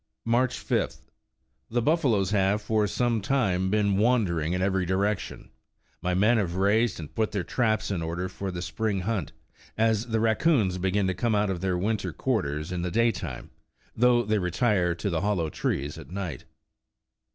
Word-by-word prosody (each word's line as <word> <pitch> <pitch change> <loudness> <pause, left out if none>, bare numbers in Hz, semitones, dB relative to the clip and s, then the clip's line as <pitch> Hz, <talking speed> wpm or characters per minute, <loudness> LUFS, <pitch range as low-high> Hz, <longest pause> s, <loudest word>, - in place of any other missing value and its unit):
''March 120 +2 +2
5th. 65 0 -2 0.6
The 120 - 0
buffaloes 120 - +2
have 100 0 +2
for 105 0 +1
some 115 +1 0
time 95 -6 +1
been 100 -1 +2
wandering 100 -8 +2
in 90 - 0
every 95 -1 +1
direction. 95 0 -2 0.5
My 90 0 0
men 110 +5 +4
have 90 -4 -2
raised 105 +3 +2
and 75 -2 -8
put 110 -1 -1
their 100 -4 -1
traps 110 -2 0
in 90 -4 -1
order 85 +3 -3
for 95 +1 -5
the 90 -1 -4
spring 105 -1 -2
hunt, 105 0 -2 0.5
as 110 +1 +2
the 110 -1 0
rac 110 0 +2
coons 110 - +2
begin 95 +2 +1
to 95 - +1
come 115 +4 0
out 105 -1 +1
of 90 -3 -4
their 95 -2 0
winter 100 -1 -1
quarters 80 - -2
in 90 -1 -2
the 90 - -1
day 115 +5 +3
time, - - -7 0.4
though 120 0 +4
they 110 -1 +1
retire 90 -1 +1
to 100 +3 -3
the 85 - 0
hollow 90 -6 0
trees 75 +3 -2
at 80 - -12
night. 90 -4 -5
100 Hz, 180 wpm, -27 LUFS, 90-110 Hz, 0.6 s, men